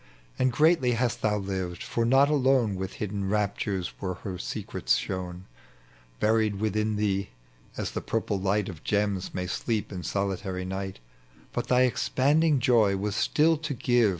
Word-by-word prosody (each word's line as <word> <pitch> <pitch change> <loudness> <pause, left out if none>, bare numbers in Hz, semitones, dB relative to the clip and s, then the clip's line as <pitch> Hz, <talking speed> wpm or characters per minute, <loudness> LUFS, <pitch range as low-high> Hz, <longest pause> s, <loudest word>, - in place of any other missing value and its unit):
Anii 130 - +4
greatly 150 -1 +3
hast 120 0 0
thou 105 -1 +2
lived, 95 -3 -4
for 115 - -1
not 135 +4 +5
alone 130 -6 +3
With 95 0 -4
hidden 100 -2 -3
raptures 100 -3 -1
woi 95 -2 -2
e - - -18
her 95 -3 -4
secrets - - -1
shown, 90 +6 -4 0.7
Buried 110 -1 +2
within 110 +1 0
thee, 100 -2 0 0.5
as - - -2
the - - -3
purple 105 -3 -1
light 100 +1 +1
Of 85 -5 -8
gems 100 -2 0
may 90 - -2
sleep 110 +4 -2
in 90 -2 -5
solitaiy 95 +1 -2
night; 95 0 -4 0.6
But - - -2
thy 125 0 +4
expanding 140 +4 +3
joy 115 -6 +3
was 100 +1 -2
still 160 +7 +3
to 150 -2 -4
give. 120 -2 +3
105 Hz, 160 wpm, -27 LUFS, 95-125 Hz, 0.7 s, not